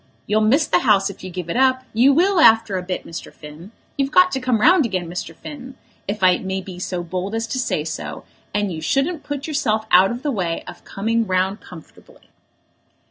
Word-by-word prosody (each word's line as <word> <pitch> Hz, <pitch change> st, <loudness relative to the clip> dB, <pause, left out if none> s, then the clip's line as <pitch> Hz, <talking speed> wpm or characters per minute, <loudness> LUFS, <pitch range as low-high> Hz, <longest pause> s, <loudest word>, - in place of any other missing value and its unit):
"You'll 215 Hz, +1 st, +1 dB
miss 265 Hz, +9 st, +3 dB
the -, -, +2 dB
House 200 Hz, -5 st, +2 dB
if 195 Hz, -, -15 dB
you 185 Hz, -, -6 dB
give 180 Hz, -1 st, -6 dB
it 170 Hz, -, -3 dB
up; 260 Hz, 0 st, +3 dB
you 245 Hz, +5 st, +5 dB
will, 360 Hz, +6 st, +3 dB
after 225 Hz, -8 st, +5 dB
a 185 Hz, -, -1 dB
bit, 180 Hz, 0 st, -5 dB
Mr. 165 Hz, -, -8 dB
Finn. 155 Hz, +6 st, -12 dB, 0.3 s
You've 275 Hz, 0 st, +1 dB
got 365 Hz, +4 st, +5 dB
to 265 Hz, -, -1 dB
come 250 Hz, -3 st, 0 dB
round 330 Hz, -, +5 dB
again, 185 Hz, -7 st, -2 dB
Mr. 175 Hz, +2 st, -6 dB
Finn, 265 Hz, -3 st, -10 dB, 0.3 s
if 205 Hz, 0 st, -4 dB
I 185 Hz, -1 st, +5 dB
may 190 Hz, 0 st, -3 dB
be 185 Hz, -1 st, -9 dB
so 180 Hz, -1 st, -3 dB
bold 185 Hz, +4 st, -4 dB
as 225 Hz, 0 st, -1 dB
to 260 Hz, +3 st, -3 dB
say 155 Hz, -11 st, -1 dB
so, 160 Hz, -, -6 dB, 0.3 s
and 205 Hz, -1 st, -1 dB
you 160 Hz, -, -6 dB
shouldn't 275 Hz, -, 0 dB
put 290 Hz, -1 st, -5 dB
yourself 235 Hz, -9 st, -1 dB
out 185 Hz, +2 st, +6 dB
of 240 Hz, +2 st, -5 dB
the 295 Hz, -, 0 dB
way 175 Hz, -8 st, -2 dB
of -, -, -11 dB
coming 225 Hz, +2 st, -1 dB
round 190 Hz, +2 st, 0 dB
comfortably." 160 Hz, -4 st, -16 dB
215 Hz, 215 wpm, -21 LUFS, 185-265 Hz, 0.3 s, out